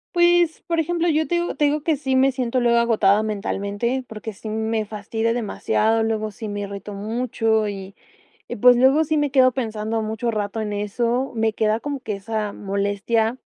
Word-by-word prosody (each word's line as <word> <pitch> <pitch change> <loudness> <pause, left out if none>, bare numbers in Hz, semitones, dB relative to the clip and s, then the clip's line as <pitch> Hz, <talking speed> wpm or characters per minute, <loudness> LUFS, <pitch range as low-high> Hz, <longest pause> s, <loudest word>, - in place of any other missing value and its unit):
Pues, 345 -1 +3
por 335 -1 0
ejemplo, 345 +1 0
yo 310 0 +1
te 345 - 0
digo 345 0 -1
te 295 - +2
digo 295 +1 +1
que 320 -1 +2
sí 265 -2 -1
me 265 +1 +4
siento 255 -1 -1
luego 235 -1 +3
agotada 215 -3 +3
mentalmente 210 +4 -2
porque 220 0 -7
sí 215 +3 -8
me 220 0 -1
fastidia 220 +2 -2
demasiado, 225 -1 0
luego 215 -1 -1
sí 220 +1 -7
me 205 0 -4
irrito 200 +1 -6
mucho 220 0 0
y 195 -1 -7 0.6
y - - -3
pues 245 +3 +6
luego 270 +5 +4
sí 310 0 0
me 290 -2 +1
quedo 260 -2 +5
pensando 225 -2 -2
mucho 220 +2 -2
rato 215 0 -3
en 210 -1 -3
eso, 235 +6 -1
me 220 -1 +1
queda 220 +1 0
como 285 -2 -4
que 215 -4 -4
esa 210 +1 -3
molestia, 205 +4 -1
225 Hz, 190 wpm, -22 LUFS, 210-260 Hz, 0.6 s, pues